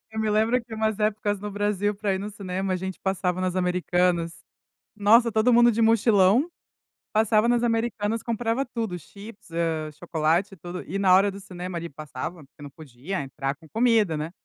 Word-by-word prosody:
Eu 220 - -3
me 215 - 0
lembro 225 +4 +2
que 230 -1 -9
umas 220 -1 -1
épocas 210 -1 0
no 210 - -5
Brasil 205 0 -1
pra 200 -1 -1
ir - - -2
no 205 +2 -5
cinema, 190 -1 -3
a 185 - +1
gente 190 0 -5
passava 185 -1 -1
nas 185 0 -1
Americanas, 180 -1 +1 0.6
nossa, 225 +3 +5
todo 225 +3 +3
mundo 240 0 +6
de 225 +1 -1
mochilão, 225 - +4 0.6
passava 215 +1 +3
nas 240 0 +2
Americanas 225 -2 0
comprava 235 +3 -1
tudo, 225 -7 -4
chips, 205 +5 -13
eh, 165 -2 -1
chocolate, 170 +4 0
tudo, 175 +1 -7
e 195 - -3
na 190 -2 +5
hora 195 +2 +5
do 195 - -9
cinema 180 -2 -7
ali 170 0 -5
passava, 155 +2 -7
porque 135 - -21
não 145 - -8
podia 145 +5 -6
entrar 135 0 -4
com 160 +2 -18
comida, 225 -6 +2
né 155 +3 -4
195 Hz, 185 wpm, -25 LUFS, 175-220 Hz, 0.6 s, mundo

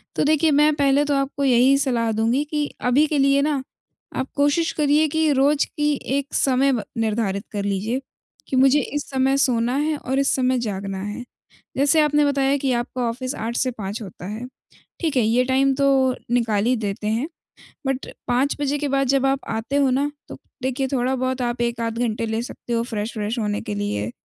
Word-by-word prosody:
तो - - +1
देखिए, 310 +1 +3
मैं 300 +1 +4
पहले 280 -1 +3
तो 290 - 0
आपको 275 0 -1
यही 260 +1 +5
सलाह 235 -5 0
दूँगी 230 +6 +1
कि 300 -1 0 0.2
अभी 255 +5 +3
के 300 -1 -1
लिए 275 0 +4
ना, 285 -2 0 0.5
आप 260 - -2
कोशिश 295 +3 +2
करिए 300 0 +2
कि 315 0 +1
रोज़ 280 +2 +3
की 295 0 -1 0.2
एक 280 0 -4
समय 270 +1 +3
ब 225 - -1
निर्धारित 215 -2 -1
कर 205 -2 -3
लीजिए, 205 +6 -1 0.5
कि 265 - -2
मुझे 270 +2 +5
इस 290 0 -4
समय 270 0 +1
सोना 245 -2 +2
है 305 +2 0
और 265 0 -2
इस 275 - +2
समय 255 -1 +1
जागना 195 -4 -4
है। 210 +4 -5 0.5
जैसे 285 +4 +4
आपने 295 -1 +3
बताया 275 -1 +2
कि 270 -2 0
आपका 245 +1 -2
ऑफिस 255 +3 -4
8 230 +2 -4
से 260 - +1
5 215 -1 -6
होता 185 -3 -9
है, 215 +5 -5 0.5
ठीक 320 -4 -1
है, - - +5
ये 235 +3 +3
टाइम 270 +1 +2
तो 265 -2 +3 0.2
निकाल 225 -4 +1
ही 250 +2 +3
देते 210 -2 -3
हैं, 225 +7 0 0.6
बट 270 0 -1 0.2
5 260 +4 +1
बजे 285 +1 0
के 290 0 -2
बाद 275 0 +1
जब 270 +1 +2
आप 270 0 +2
आते 225 +5 -3
हो 280 -2 +3
ना, 280 +3 +1 0.2
तो - - -9 0.3
देखिए 265 +1 -1
थोड़ा 255 +1 +1
बहुत 255 0 -2
आप 240 0 -2
1 235 -1 -1
आध 230 0 -2
घंटे 230 -1 -1
ले 220 0 -2
सकते 240 -1 -7
हो 230 - +1
फ्रेश-व्रेश 220 0 -3
होने 210 -1 -1
के 105 - -5
लिए, 105 +2 -2
260 Hz, 205 wpm, -22 LUFS, 230-280 Hz, 0.6 s, यही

